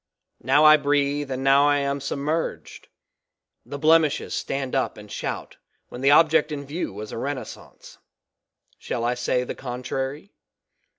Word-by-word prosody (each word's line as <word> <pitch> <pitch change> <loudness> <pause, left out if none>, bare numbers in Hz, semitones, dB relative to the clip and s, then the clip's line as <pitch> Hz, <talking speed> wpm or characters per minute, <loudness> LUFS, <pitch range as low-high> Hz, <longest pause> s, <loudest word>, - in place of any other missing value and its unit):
Now 140 +5 +4
I 155 0 +9
breathe 145 0 0
and 130 0 -4
now 140 +1 +5
I 145 - +3
am 140 0 -2
sub - - -3
merged; 155 +4 -4 0.8
the 140 - -7
blemishes 155 0 +2
stand 135 -1 -3
up 135 - -1
and 105 -1 -12
shout - - -5 0.3
when 125 - -9
the 135 - +3
object 155 +1 +4
in 140 -1 -5
view 150 -1 -4
was 105 +2 -8
a - - -5
renaissance; 130 -3 -7 0.8
shall 115 - -4
I 120 - +1
say 125 0 -1
the - - -5
contrary? 135 - -5
140 Hz, 155 wpm, -24 LUFS, 130-145 Hz, 0.8 s, I